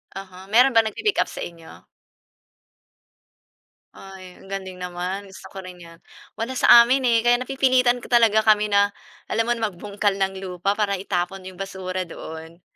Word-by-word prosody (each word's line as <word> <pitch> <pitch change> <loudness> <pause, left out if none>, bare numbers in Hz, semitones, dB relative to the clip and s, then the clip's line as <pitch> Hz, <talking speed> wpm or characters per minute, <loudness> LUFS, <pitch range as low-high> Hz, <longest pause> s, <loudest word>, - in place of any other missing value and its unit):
Uh-huh, 190 0 -10
meron 250 +4 +5
ba 225 - +6
nag-pi-pick-up 310 - -1
sa - - -8
inyo? 165 -1 -13 2.1
Ay, 190 -1 -13
ang - - -17
galing 190 -1 -7
naman, 180 +2 -5
gusto 190 -1 -13
ko 190 -1 -9
rin 180 -1 -11
'yan. 165 0 -14 0.4
Wala 230 +3 -3
sa 240 -2 +7
amin 260 +3 +1
eh, 230 -1 +4
kaya 240 +1 +3
napipilitan 255 -2 +2
talaga 225 -3 +3
kami 210 -1 +3
na, 200 0 +2 0.3
alam 230 +1 -1
mo - - +3
na, 225 - -1
magbungkal 205 +1 -2
ng 195 -1 -2
lupa 190 +1 -3
para 205 -2 0
itapon 185 0 -3
'yong 185 - -15
basura 185 -1 -5
doon. 160 +1 -10
195 Hz, 160 wpm, -22 LUFS, 185-225 Hz, 2.1 s, sa